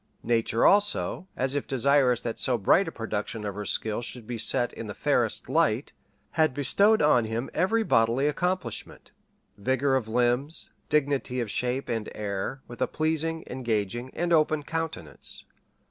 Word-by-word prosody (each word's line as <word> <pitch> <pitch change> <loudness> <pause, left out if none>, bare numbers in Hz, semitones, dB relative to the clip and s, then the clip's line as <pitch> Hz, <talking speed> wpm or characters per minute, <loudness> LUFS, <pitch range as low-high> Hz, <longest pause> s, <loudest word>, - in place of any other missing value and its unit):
Nature, 115 -1 +1
also, 205 -2 +3
as 130 +1 +2
if 145 - -2
desirous 130 -2 +3
that 115 -2 -4
so 125 -2 +1
bright 170 - +3
a - - -3
production 110 -2 -4
of 100 - -3
her 105 +1 -5
skill 110 +3 -1
should 120 -1 -4
be 120 - -5
set 120 +2 +1
in 115 - -7
the 105 - -6
fairest - - 0
light, - - +1 0.4
had 155 -5 +2
bestowed 200 +9 +3
on 125 -6 +4
him 115 +3 -3
every 220 +6 +2
bodily 115 - +2
accomplishment 180 +5 -3 0.5
vigor 130 +5 +1
of 125 -4 -1
limbs, 125 +6 0 0.2
dignity 140 -4 +1
of 115 -4 -2
shape 125 +2 0
and 115 -3 -3
air, 105 +6 -4
with 120 - -10
a - - +3
pleasing, 160 +1 -1
engaging, 120 -1 -2
and 175 0 0
open 155 -1 +3
countenance. 160 - -5
130 Hz, 160 wpm, -27 LUFS, 115-150 Hz, 0.5 s, on